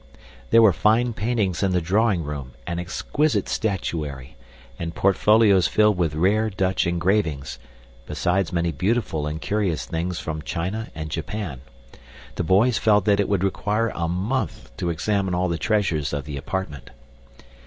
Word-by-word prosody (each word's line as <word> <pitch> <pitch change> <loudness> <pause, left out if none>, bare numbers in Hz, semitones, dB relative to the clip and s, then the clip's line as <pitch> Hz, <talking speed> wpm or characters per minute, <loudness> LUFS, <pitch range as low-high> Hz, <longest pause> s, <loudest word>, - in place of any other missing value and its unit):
There 115 0 +6
were 105 -4 +6
fine 115 +5 +2
paintings 105 -5 -1
in 95 -2 +1
the 90 - +3
drawing 95 +1 +1
room 70 -4 -6
and 85 -1 -3
exquisite 140 - -1
statuary, 75 - -3 0.4
and 85 -1 -4
portfolios 100 -2 +4
filled 105 +3 +3
with 85 -4 0
rare 105 +7 +2
Dutch 95 -2 0
engravings, 85 -4 0 0.5
besides 90 0 0
many 85 -1 0
beautiful 80 - -1
and 75 +1 -4
curious 100 -4 -1
things 85 +2 -3
from 80 -1 -4
China 95 +9 -3
and 80 -1 -6
Japan. 85 - -4 0.7
The - - -2
boys 105 +8 +3
felt 105 -3 +3
that 100 -1 +3
it 100 - +1
would 100 -2 +1
require 105 +3 0
a 85 -1 -2
month 100 +10 -3
to 85 - -2
examine 95 +2 0
all 90 +1 +1
the 85 -1 -2
treasures 90 -10 0
of 70 -2 -3
the 75 -1 -6
apartment. 75 -1 -5
90 Hz, 155 wpm, -23 LUFS, 80-105 Hz, 0.7 s, There